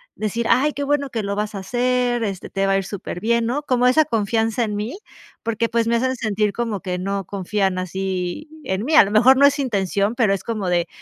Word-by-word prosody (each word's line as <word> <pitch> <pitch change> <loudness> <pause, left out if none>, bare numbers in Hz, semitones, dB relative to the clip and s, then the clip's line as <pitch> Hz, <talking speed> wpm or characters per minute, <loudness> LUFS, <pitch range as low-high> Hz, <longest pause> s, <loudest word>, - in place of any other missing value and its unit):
decir: 225 +2 -2
"Ay, 275 +5 +3
que 285 - -3
bueno 280 -1 0
que 225 -2 -2
lo 200 0 -3
vas 210 0 -3
a - - -3
hacer, 245 +3 0
este, 195 -3 -5
te 195 0 -1
va 195 - +2
a - - +3
ir 195 - -1
superbién", 215 +4 -2
¿no? 255 +6 -1
Como 250 -3 +2
esa 310 +5 +5
confianza 225 -1 0
en 210 -1 -4
mí, 215 - -4 0.5
porque, 230 0 -1
pues, 230 0 0
me 235 - +2
hacen 260 +2 0
sentir 215 -2 0
como 220 -3 -3
que 180 -2 -3
no 195 +1 -3
confían 195 0 -1
así 185 - -3 0.2
en 190 +2 -2
mí. 305 +5 +1
A 255 - +8
lo 200 - -5
mejor 250 +5 +6
no 280 - +6
es 280 +1 +3
intención, 205 -4 0
pero 225 -5 +2
es 195 - -3
como 215 -5 -3
de 175 -1 +1
220 Hz, 235 wpm, -21 LUFS, 195-245 Hz, 0.5 s, A